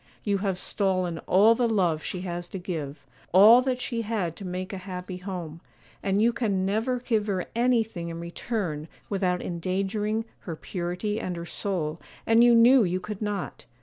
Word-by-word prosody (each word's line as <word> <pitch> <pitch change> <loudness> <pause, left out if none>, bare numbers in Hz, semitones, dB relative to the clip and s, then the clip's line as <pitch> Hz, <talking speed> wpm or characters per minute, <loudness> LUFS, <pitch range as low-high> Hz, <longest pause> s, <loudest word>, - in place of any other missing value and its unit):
You 200 -2 +1
have 195 -2 -1
stolen 185 -3 -1
all 210 +5 +6
the 235 0 +1
love 175 -8 +1
she 180 - -5
has 175 -1 -4
to - - -5
give, 155 -6 -5 0.3
all 215 +7 +8
that 255 -1 -1
she 235 -2 -2
had 205 -7 -2
to - - -8
make 185 +2 -4
a 190 - -4
happy 180 -1 -6
home; 180 -4 -6 0.4
and 195 0 +1
you 235 +2 +4
can 200 -6 0
never 225 +6 0
give 225 -4 0
her 190 -3 -1
anything 225 -8 +1
in 165 0 -6
return 170 -3 -3 0.2
without 185 -3 0
endangering 195 +5 -2
her 170 - -6
purity 180 +6 -3
and 180 -5 -3
her 170 0 -6
soul, 170 -4 -3 0.2
and 225 +1 +5
you 240 -1 +6
knew 240 +2 +7
you 180 -1 0
could 205 +2 -7
not. 205 -8 -4
190 Hz, 180 wpm, -26 LUFS, 175-220 Hz, 0.4 s, all